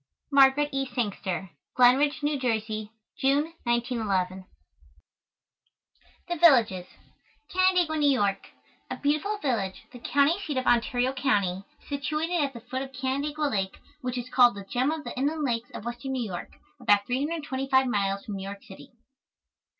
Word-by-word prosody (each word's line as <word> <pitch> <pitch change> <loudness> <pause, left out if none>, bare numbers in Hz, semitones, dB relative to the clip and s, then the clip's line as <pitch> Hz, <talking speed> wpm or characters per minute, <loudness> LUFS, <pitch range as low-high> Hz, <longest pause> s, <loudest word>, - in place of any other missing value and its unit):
Margaret 280 +1 +5
E. 270 -1 -1
Sangster. 195 -6 -3 0.2
Glen 250 0 +7
Ridge, 295 +1 0
New 290 -1 0
Jersey, 220 -3 -2 0.3
June, 285 +4 +2
1911. 210 -6 -1 1.8
THE 350 -1 -2
VILLAGES 230 - +5 0.7
CANANDAIGUA, 365 -4 +3
NEW 290 -1 +4
YORK. 205 -7 +1 0.4
A - - -4
beautiful 305 +9 0
village, 230 - -2
the 245 - -10
county 285 +8 +2
seat 305 -9 -4
of 255 - -1
Ontario 245 +2 +2
County, 200 -8 0 0.2
situated 305 +4 -1
at 275 -1 -2
the 235 - -9
foot 255 +2 -4
of 270 0 -6
Canandaigua 280 +4 -2
Lake, 195 -7 -2 0.2
which 250 -1 -3
is 245 0 -4
called 245 -3 +5
"the 200 -1 -8
gem 250 +7 0
of 315 -1 -3
the - - -7
inland 295 +4 -1
lakes" 240 -2 -1
of 215 - -9
Western 240 +3 -4
New 255 -2 -1
York, 180 -4 -6 0.3
about 205 0 +3
325 270 -1 0
miles 200 -4 -1
from 205 -2 -5
New 190 - -6
York 200 +1 -7
city. 190 - -13
255 Hz, 150 wpm, -27 LUFS, 215-285 Hz, 1.8 s, Glen